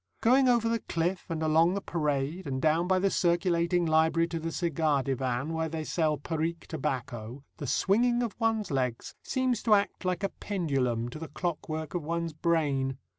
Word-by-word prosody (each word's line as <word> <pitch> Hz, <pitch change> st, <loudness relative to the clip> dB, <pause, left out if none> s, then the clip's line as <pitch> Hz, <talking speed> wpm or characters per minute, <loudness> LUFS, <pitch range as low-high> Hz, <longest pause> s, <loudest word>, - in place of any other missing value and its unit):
Going 255 Hz, +3 st, +4 dB
over 235 Hz, -2 st, +3 dB
the 230 Hz, 0 st, +1 dB
cliff 175 Hz, +1 st, -2 dB
and 160 Hz, -1 st, -2 dB
along 160 Hz, +3 st, +4 dB
the -, -, 0 dB
parade, 150 Hz, 0 st, -2 dB
and 130 Hz, -1 st, -2 dB
down 160 Hz, +4 st, +2 dB
by 185 Hz, 0 st, +3 dB
the 195 Hz, +1 st, +2 dB
circulating 175 Hz, 0 st, +2 dB
library 160 Hz, +1 st, +3 dB
to 165 Hz, -1 st, -3 dB
the 165 Hz, +1 st, -3 dB
cigar 155 Hz, -5 st, +1 dB
divan, 135 Hz, +2 st, -1 dB
where 160 Hz, 0 st, -1 dB
they 160 Hz, 0 st, -3 dB
sell 155 Hz, -1 st, 0 dB
Parique 165 Hz, +3 st, -3 dB
tobacco, 130 Hz, -4 st, -4 dB
the 145 Hz, -, -5 dB
swinging 240 Hz, -, +2 dB
of 230 Hz, -, -3 dB
one's 225 Hz, -4 st, 0 dB
legs 125 Hz, -4 st, -2 dB
seems 255 Hz, -3 st, 0 dB
to 220 Hz, -3 st, +5 dB
act 200 Hz, 0 st, -1 dB
like 185 Hz, +1 st, -1 dB
a 195 Hz, -, +1 dB
pendulum 135 Hz, -, -1 dB
to 140 Hz, -, -8 dB
the 160 Hz, -, -6 dB
clockwork 155 Hz, -1 st, -4 dB
of 175 Hz, -, -1 dB
one's 165 Hz, +1 st, -2 dB
brain. 145 Hz, -5 st, 0 dB
165 Hz, 180 wpm, -29 LUFS, 145-185 Hz, -, to